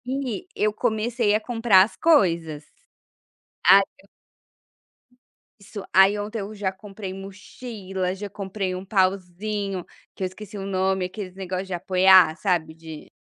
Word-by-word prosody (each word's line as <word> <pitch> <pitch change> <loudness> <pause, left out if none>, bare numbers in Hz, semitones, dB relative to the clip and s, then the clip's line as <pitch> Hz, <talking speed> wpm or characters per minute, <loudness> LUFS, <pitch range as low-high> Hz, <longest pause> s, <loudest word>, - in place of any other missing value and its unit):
E 260 - -4
eu 210 0 +1
comecei 220 -1 0
a - - +2
comprar 225 -4 +4
as 210 - -5
coisas. 170 - +2 1.0
Ah, 195 +3 +9 0.2
eu 200 - -23 1.5
Isso. 200 0 -9
Aí 195 +2 +6
ontem 210 +2 -4
eu 205 +1 -6
já 200 -2 -2
comprei 195 0 -9
mochila, 195 -1 -6
já 205 +1 -7
comprei 195 -1 -4
um 185 +1 -7
pauzinho, 195 0 -1 0.3
que - - -5
eu - - +1
esqueci 205 +2 -10
o 195 - -5
nome, 190 -1 0
aqueles 185 0 -7
negócio 190 0 -4
de 190 - -6
apoiar, 185 -2 +5
sabe, 175 -6 -1
de 160 -1 -11
195 Hz, 140 wpm, -24 LUFS, 185-210 Hz, 1.5 s, Ah